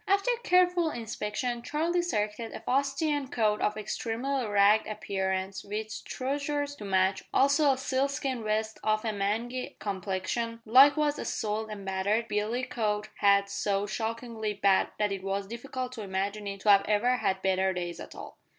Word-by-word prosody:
After 395 +5 +3
careful 360 -2 +3
inspection 235 0 -3
Charlie 325 +7 0
selected 220 -8 -2
a - - -7
fustian 280 +2 0
coat 215 -4 +1
of 210 +1 0
extremely 235 +4 -2
ragged 205 +1 +4
appearance, 190 -2 -2
with 215 +1 -5
trousers 285 +2 -2
to 210 - -8
match, 190 0 +2
also 280 +2 +4
a 265 - 0
sealskin 265 -2 -1
vest 215 +1 -1
of 215 +1 +1
a 220 - 0
mangy 225 +6 -2
complexion, 200 +4 -3
likewise 290 +5 +5
a - - -4
soiled 220 -1 -2
and 205 -2 -7
battered 200 +4 0
billycock 215 -1 -1
hat 200 0 +4
so 200 0 -1
shockingly 225 0 -3
bad 195 -1 +3
that 210 -1 +1
it 195 -1 -3
was 195 +1 -2
difficult 250 +3 -5
to 245 -3 -7
imagine 200 +1 -3
it 200 -1 -5
to 210 - +1
have 200 0 +6
ever 230 +4 +2
had 190 -5 -1
better 190 0 +2
days 175 -2 -4
at - - -9
all. - - -10
215 Hz, 160 wpm, -29 LUFS, 200-255 Hz, -, have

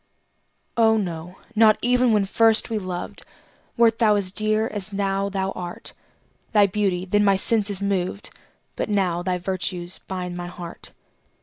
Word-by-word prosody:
Oh, 220 -1 +4
no 175 -2 -5 0.2
not 215 -1 +5
even 250 0 +3
when 210 -2 +2
first 225 +3 +3
we 220 - 0
loved, 185 -2 -6 0.6
Wert 230 -1 +3
thou 215 -3 +4
as 195 -2 +1
dear 215 +1 0
as 205 -2 -1
now 195 0 -1
thou 195 -1 -2
art; 175 -2 -7 0.6
Thy 205 -2 +6
beauty 190 -2 -1
then 205 +2 +2
my 200 -1 +4
senses 200 -1 +3
moved, 200 0 -2 0.4
But - - -3
now 185 -4 0
thy 180 0 -1
virtues 180 -1 -3
bind 180 -2 -6
my 175 0 -5
heart. 175 -1 -10
195 Hz, 150 wpm, -23 LUFS, 180-215 Hz, 0.6 s, Thy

